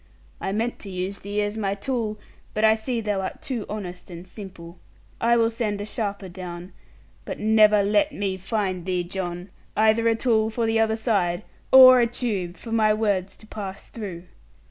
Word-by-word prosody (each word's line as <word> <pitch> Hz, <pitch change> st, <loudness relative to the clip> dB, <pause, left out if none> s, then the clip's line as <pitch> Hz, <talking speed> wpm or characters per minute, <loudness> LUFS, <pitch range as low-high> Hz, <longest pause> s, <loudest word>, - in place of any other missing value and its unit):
I 190 Hz, -, -3 dB
meant 225 Hz, +4 st, -2 dB
to 200 Hz, -, -8 dB
use 185 Hz, +1 st, -4 dB
thee 205 Hz, +2 st, -2 dB
as 205 Hz, +2 st, -3 dB
my 200 Hz, -2 st, -1 dB
tool; 220 Hz, -1 st, -2 dB, 0.4 s
but 215 Hz, +1 st, +3 dB
I 220 Hz, -, +7 dB
see 225 Hz, +2 st, -2 dB
thou 205 Hz, -3 st, -1 dB
art 190 Hz, -, -5 dB
too 255 Hz, -8 st, -4 dB
honest 185 Hz, -4 st, -6 dB
and 175 Hz, +1 st, -9 dB
simple. 180 Hz, -4 st, -10 dB, 0.4 s
I 235 Hz, +1 st, +3 dB
will 230 Hz, 0 st, +3 dB
send 215 Hz, -3 st, -2 dB
a 205 Hz, -, -4 dB
sharper 205 Hz, -3 st, -3 dB
down; 180 Hz, 0 st, -8 dB, 0.5 s
but -, -, -5 dB
never 215 Hz, -1 st, +5 dB
let 210 Hz, +10 st, +2 dB
me 200 Hz, -7 st, -2 dB
find 190 Hz, -2 st, -2 dB
thee, 180 Hz, -1 st, 0 dB
John, 180 Hz, 0 st, -5 dB, 0.3 s
either 220 Hz, +1 st, +4 dB
a 225 Hz, -, +4 dB
tool 220 Hz, -2 st, +2 dB
for 230 Hz, +1 st, -1 dB
the 225 Hz, 0 st, +2 dB
other 220 Hz, 0 st, +2 dB
side, 200 Hz, -5 st, 0 dB, 0.3 s
or 255 Hz, -1 st, +10 dB
a 235 Hz, -, +4 dB
tube 205 Hz, -7 st, -2 dB
for 230 Hz, -, -9 dB
my 215 Hz, -2 st, +3 dB
words 200 Hz, -4 st, -1 dB
to -, -, -15 dB
pass 200 Hz, -2 st, -7 dB
through.' 190 Hz, -7 st, -7 dB
210 Hz, 190 wpm, -24 LUFS, 190-225 Hz, 0.5 s, or